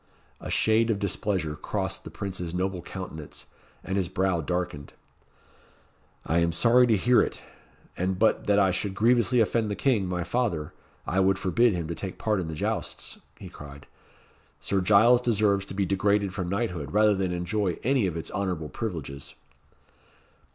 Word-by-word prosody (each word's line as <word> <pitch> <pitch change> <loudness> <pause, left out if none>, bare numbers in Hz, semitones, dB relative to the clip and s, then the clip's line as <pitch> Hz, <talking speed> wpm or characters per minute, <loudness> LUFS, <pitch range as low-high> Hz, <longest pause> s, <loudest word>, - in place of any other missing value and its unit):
A - - -8
shade 110 +1 +2
of 110 - +1
displeasure 95 -5 -2
crossed - - -3
the - - -8
Prince's 90 -3 -5
noble 95 0 -2
countenance, 80 -5 -8 0.4
and 95 - -2
his 95 -3 0
brow 95 -3 0
darkened. 80 -3 -4 1.3
"I 80 +2 +2
am 85 0 +2
sorry 120 +8 +5
to 110 -3 +3
hear 120 +5 +4
it; - - -3 0.5
and 95 +1 -1
but 110 +3 +2
that 100 -1 +4
I 95 -2 +4
should 95 +2 -2
grievously 120 +1 +3
offend 110 +1 +1
the 105 - -2
King, 110 -8 +1
my 90 -1 -2
father, 90 -9 -2 0.3
I 95 - 0
would 95 0 +3
forbid 115 +4 +2
him 85 -3 -3
to 85 - -3
take 95 +2 -6
part 105 -3 0
in 90 - -3
the 80 - -5
jousts," - - -4 0.2
he - - -10
cried. 70 -1 -11 0.7
"Sir 100 -1 0
Giles 110 +6 +5
deserves 105 -4 +2
to - - -6
be 100 0 +1
degraded 100 +1 +1
from 95 -3 -3
knighthood, 90 - -3
rather 105 0 +5
than 95 -2 -1
enjoy 90 +1 -1
any 125 -4 +2
of 85 -2 -3
its 80 - -6
honourable 90 -6 -3
privileges." 75 - -6
95 Hz, 170 wpm, -26 LUFS, 90-105 Hz, 1.3 s, sorry